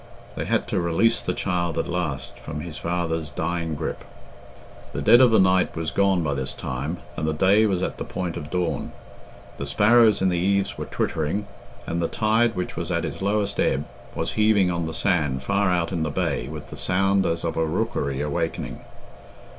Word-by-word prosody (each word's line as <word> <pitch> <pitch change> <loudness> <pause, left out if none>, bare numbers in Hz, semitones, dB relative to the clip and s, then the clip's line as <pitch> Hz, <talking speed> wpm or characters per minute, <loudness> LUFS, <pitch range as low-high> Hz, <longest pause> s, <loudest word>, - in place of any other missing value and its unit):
They - - -3
had - - 0
to - - 0
release 85 +8 +2
the - - -2
child 85 -3 -1
at 80 - 0
last 80 -6 -3
from 75 +1 -6
his 85 -1 -7
father's 80 -2 -2
dying 80 +2 -2
grip. - - -4 0.9
The - - -3
dead 120 - +7
of 125 - +7
the 110 - +4
night 95 -1 +3
was 80 -1 -2
gone 95 -3 +2
by 70 -2 0
this 65 -1 -1
time, 70 +6 -4 0.2
and 80 - -2
the 80 - 0
day 100 +6 +4
was 95 -3 0
at - - -3
the - - -2
point 90 -2 -4
of 75 - -6
dawn; 90 0 -2 0.7
the 70 - -3
sparrows 110 +7 +5
in 95 - +2
the 90 -1 0
eaves 100 +2 +1
were - - -5
twittering, 80 +7 -1 0.4
and 85 +1 -2
the 85 - +1
tide, 110 +4 +2
which 90 - -3
was - - -4
at - - 0
its - - -6
lowest 100 0 0
ebb, 70 +2 +1 0.3
was - - -1
heaving 105 -4 +3
on 85 -1 -2
the 80 - -5
sand 75 -10 +1
far 100 +2 +1
out 85 -1 0
in 85 -3 -1
the 80 - 0
bay 70 - -1
with - - -8
the - - -7
sound 95 +1 +2
as 85 0 -1
of 85 - -2
a 80 - +1
rookery 80 - -1
awakening. 80 +3 -3
85 Hz, 200 wpm, -24 LUFS, 80-100 Hz, 0.9 s, dead